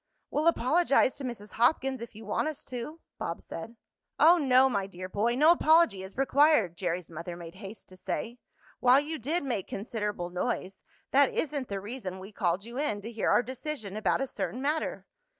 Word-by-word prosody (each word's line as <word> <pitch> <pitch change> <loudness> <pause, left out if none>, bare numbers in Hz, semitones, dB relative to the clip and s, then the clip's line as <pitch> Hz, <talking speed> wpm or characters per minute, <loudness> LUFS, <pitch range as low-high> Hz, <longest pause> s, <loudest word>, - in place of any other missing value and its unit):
"We'll 305 +3 +1
apologize 300 -2 +3
to 280 - -7
Mrs. 235 -5 -6
Hopkins, 260 +1 +1
if 235 - -8
you 220 +1 -10
want 210 +8 0
us 310 -2 -5
to," 265 +6 -7 0.2
Bob 170 - -3
said. 220 +8 -8 0.4
"Oh, 340 +2 +7
no, 260 -2 +5
my 200 -6 -1
dear 185 -1 -7
boy, 215 +5 0
no 305 +5 +6
apology 320 - +4
is 190 +3 -10
required!" 270 - +4
Jerry's 175 -1 -3
mother 170 +2 -6
made 170 -1 -9
haste 200 +2 -10
to 185 - -14
say. 235 +6 -4 0.4
"While 255 +2 +6
you 310 +2 -4
did 305 +8 -1
make 235 -9 -2
considerable 205 -4 -4
noise, 190 0 -3 0.3
that 280 0 +5
isn't 285 -4 -2
the 200 -1 -3
reason 200 -3 -6
we 190 +2 -10
called 185 0 -1
you 240 +3 -6
in 215 -9 -1
to 225 +3 -7
hear 225 -2 -1
our - - +4
decision 255 -5 -5
about 215 +4 +1
a - - +1
certain 255 - -4
matter. 300 +4 -2
235 Hz, 190 wpm, -29 LUFS, 195-280 Hz, 0.4 s, Oh